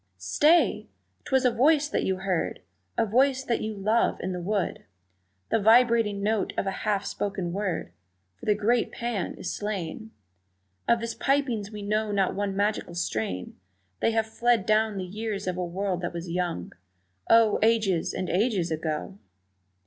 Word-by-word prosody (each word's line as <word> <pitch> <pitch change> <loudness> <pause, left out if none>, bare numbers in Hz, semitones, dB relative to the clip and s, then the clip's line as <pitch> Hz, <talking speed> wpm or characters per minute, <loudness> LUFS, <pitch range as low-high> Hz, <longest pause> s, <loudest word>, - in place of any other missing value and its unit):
Stay! 295 - +3 0.4
'twas 265 -3 +2
a 250 - +5
voice 295 +5 +3
that - - -1
you 190 - +1
heard, 185 -2 -2 0.4
A - - +3
voice 260 +5 +2
that 240 -3 -1
you 215 0 -3
love, 215 +4 +1
in 185 - -2
the 180 -1 -4
wood, 200 +1 -2 0.7
The - - +3
vibrating 225 -2 +4
note 215 -1 0
of - - 0
a 195 - 0
half 205 0 -1
spoken 195 -4 -3
word 190 -4 -2 0.5
For - - -11
the 210 - +4
great 230 +3 +1
Pan 235 -6 -3
is - - -4
slain, 205 0 -4 0.8
Of 235 -1 +3
his 230 -1 -3
pipings 255 -7 0
we 210 -1 -7
know 215 +1 0
not 195 -2 +1
one 200 -1 -2
magical 205 -3 -1
strain, 110 - -3 0.4
They - - +2
have 225 -1 +1
fled 230 -2 +1
down 215 -1 +2
the 185 - -3
years 210 +2 -4
of 185 -1 -1
a 180 - -2
world 180 +1 -2
that 175 - -3
was 170 0 -5
young 175 - -2 0.6
Oh, 225 -2 +5
ages 215 -6 +2
and 185 - -3
ages 190 -4 +1
ago! 155 - -3
205 Hz, 165 wpm, -27 LUFS, 185-230 Hz, 0.8 s, a